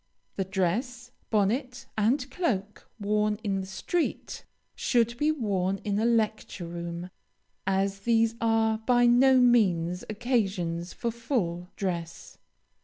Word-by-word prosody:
The 195 - -1
dress, 225 +7 -2 0.2
bonnet, 250 +5 0
and 255 +6 +1
cloak, 210 - -2
worn 210 +1 +1
in 195 -2 -1
the 190 - -7
street, 320 - -3 0.3
should 235 -1 +1
be 300 +1 +3
worn 195 -9 -1
in 205 0 0
a 220 - +1
lecture 220 -5 0
room, 170 +1 -6 0.6
as 195 +1 +1
these 230 +1 +2
are, 225 -1 +2
by 245 +2 +3
no 260 +2 +6
means, 185 -8 +3
occasions 195 -7 -1
for 235 - -3
full 205 -8 -2
dress. 170 -4 -5
215 Hz, 120 wpm, -28 LUFS, 190-240 Hz, 0.6 s, no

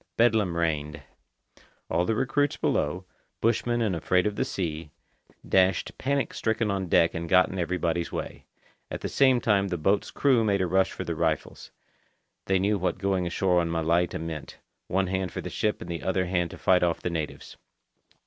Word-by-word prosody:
Bedlam 110 -7 +3
reigned. 75 -3 -2 0.8
All 85 +2 +1
the 110 - 0
recruits 140 +4 0
below, 90 +6 -1 0.3
bushmen 120 +1 +1
and 100 -5 0
afraid 90 +2 +1
of 105 -1 -1
the - - 0
sea, 80 -4 -4 0.6
dashed 95 -2 +2
panic 140 +1 -1
stricken 110 -1 0
on 95 -2 -2
deck 85 0 +3
and 85 0 -4
got 90 +1 +5
in 95 - -5
everybody's 85 -1 -1
way. - - -6 0.4
At - - -5
the - - -2
same 130 -2 +4
time 100 -4 +2
the 90 -2 -2
boat's 95 +6 +1
crew 130 -5 +2
made 100 -2 +1
a - - +1
rush 95 +2 +2
for - - -5
the - - -3
rifles. - - -2 0.8
They 95 - +2
knew 100 +2 +1
what 90 - -1
going 95 -2 0
ashore 90 0 +2
on 85 - -2
Malaita 85 +1 +1
meant—one 80 +3 -5
hand 95 0 -2
for - - -5
the - - -7
ship 105 -1 -1
and 85 - -7
the 85 -2 -4
other 95 0 0
hand 90 -1 0
to - - -10
fight 90 -1 +3
off 85 -1 0
the 90 - -1
natives. 80 -2 -5
95 Hz, 185 wpm, -27 LUFS, 85-105 Hz, 0.8 s, got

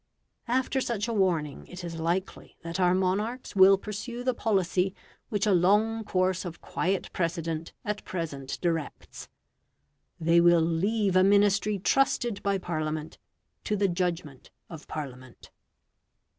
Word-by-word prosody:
After 260 +2 0
such 230 -3 -2
a 230 - -2
warning, 170 -8 0
it 180 0 -9
is 165 -1 -6
likely 175 +4 -3
that 170 +2 -4
our 180 0 +4
monarchs 205 +8 -1
will 195 0 +7
pursue 220 +5 -6
the 255 0 +1
policy 190 -4 0 0.3
which 205 -1 0
a 210 - +3
long 210 +5 +3
course 185 -2 0
of 175 -3 -7
quiet 190 +1 -2
precedent 165 -2 -2
at 210 0 -3
present 145 -7 -5
directs 165 -4 -4 0.9
they 170 +1 +4
will 175 0 +6
leave 190 +5 +1
a 185 - +6
Ministry 200 +1 +3
trusted 240 +1 +1
by 200 -1 +1
Parliament 155 -3 -4 0.4
to 210 - -1
the 200 -1 +2
judgment 170 -6 -3 0.2
of 160 -2 -10
Parliament. 130 -4 -8
185 Hz, 135 wpm, -28 LUFS, 165-205 Hz, 0.9 s, will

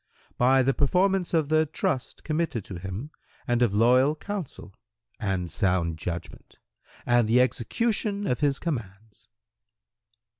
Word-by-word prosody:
"—"By 130 +2 +4
the 135 +2 +2
performance 185 +6 +1
of 160 -4 +1
the 155 0 +3
trust 130 -3 -3
committed 155 - -1
to 90 -3 -7
him 95 - -6 0.4
and 120 0 +1
of 120 -4 +3
loyal 125 +7 +4
counsel 165 - -7 0.5
and 95 -3 -1
sound 90 -5 0
judgment 85 +1 -7 0.5
and 120 -2 +3
the 120 +2 +5
execution 205 - 0
of 125 - 0
his 140 -2 +1
commands." 110 - -6
125 Hz, 125 wpm, -26 LUFS, 105-155 Hz, 0.5 s, the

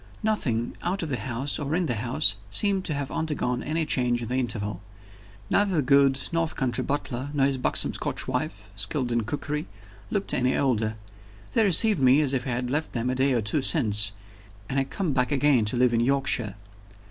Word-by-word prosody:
Nothing, 125 - -1
out 185 +2 -2
of 160 - -4
the 130 - -1
house 130 +3 -3
or 145 +1 -2
in 180 0 0
the 125 - -1
house, 120 +7 +2
seemed 200 -2 +2
to 155 - -1
have 140 -1 -4
undergone 145 -6 -2
any 160 +2 -2
change 120 -4 0
in 115 - -6
the 125 - -2
interval. 105 -6 -1 0.7
Neither 200 -2 +2
the 155 - +2
good 140 0 +4
North 165 -1 -1
country 130 -2 -1
butler, 140 -2 -3
nor 135 -2 +3
his 135 -1 -1
buxom - - +1
Scotch - - -2
wife, 100 0 -4
skilled 120 +6 +3
in 120 -2 0
cookery, 145 +4 -4 0.4
looked 200 -2 -2
any 125 +1 +1
older: 110 -5 0 0.6
they 225 - +2
received 205 0 +6
me 130 +1 +5
as 140 -3 0
if 130 0 -2
I - - -2
had 125 0 -2
left 155 +3 -2
them 125 +1 -1
a - - -1
day 130 +1 +1
or 120 -3 0
two 105 +8 0
since, 105 - +3 0.6
and 135 - -1
had 135 0 -2
come 180 -7 -2
back 125 +1 0
again 140 -5 +3
to 110 +4 0
live 125 -1 +3
in 115 - +2
Yorkshire. 120 -4 0
130 Hz, 205 wpm, -25 LUFS, 120-150 Hz, 0.7 s, received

